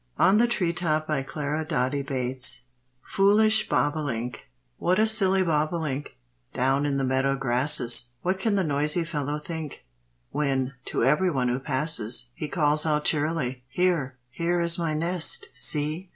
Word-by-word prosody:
FOOLISH 235 +6 +3
BOBOLINK. 170 -4 -1
By 150 -3 -1
Mrs. 135 - -11
Clara 150 +1 -4
Doty 140 -3 -2
Bates. 130 -2 +1 2.2
What 180 +1 +1
a 215 - +3
silly 195 -4 +4
bobolink, 155 - -2 0.4
Down 135 +3 0
in 140 -1 -1
the 135 - -1
meadow 130 +1 0
grasses! 125 -2 +4
What 185 +1 -1
can 210 +1 0
the 195 - +1
noisy 150 +2 +1
fellow 150 -3 -4
think, 155 -1 -8 0.5
When, 135 -2 -2
to - - -2
everyone 140 -2 +1
who 125 +1 -2
passes, 130 -4 -1
He 150 - -6
calls 150 -1 +2
out 150 -1 -1
cheerily, 145 -5 -1
"Here, 160 -6 -1
here 175 +4 -1
is 170 0 +1
my 165 -2 -2
nest! 170 +2 0
See! 155 +5 0
150 Hz, 135 wpm, -25 LUFS, 135-170 Hz, 2.2 s, silly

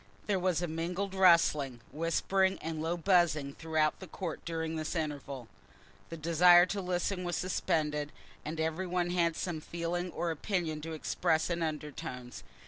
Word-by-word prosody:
There 200 -2 +1
was 180 -1 +1
a - - 0
mingled 175 +5 -3
rustling, 165 -9 +4
whispering, 190 +4 +1
and 160 -1 -4
low 165 +2 -1
buzzing 165 -6 +2
throughout 160 -1 0
the 190 - -9
court 170 -4 -5
during 160 -1 -2
this 155 +1 -3
interval. 140 -6 -4 0.6
The 165 - -6
desire 175 +2 +6
to 195 +2 -3
listen 180 +1 -1
was 175 -1 -2
suspended, 150 -5 -1 0.3
and 155 +2 -5
every 160 +4 -1
one 175 0 0
had 170 -2 +2
some 170 -4 -3
feeling 170 +2 -3
or 170 0 -1
opinion 160 -2 -2
to 160 +1 -5
express 160 +1 0
in 170 0 -1
undertones. 150 - -5
165 Hz, 155 wpm, -31 LUFS, 155-180 Hz, 0.6 s, desire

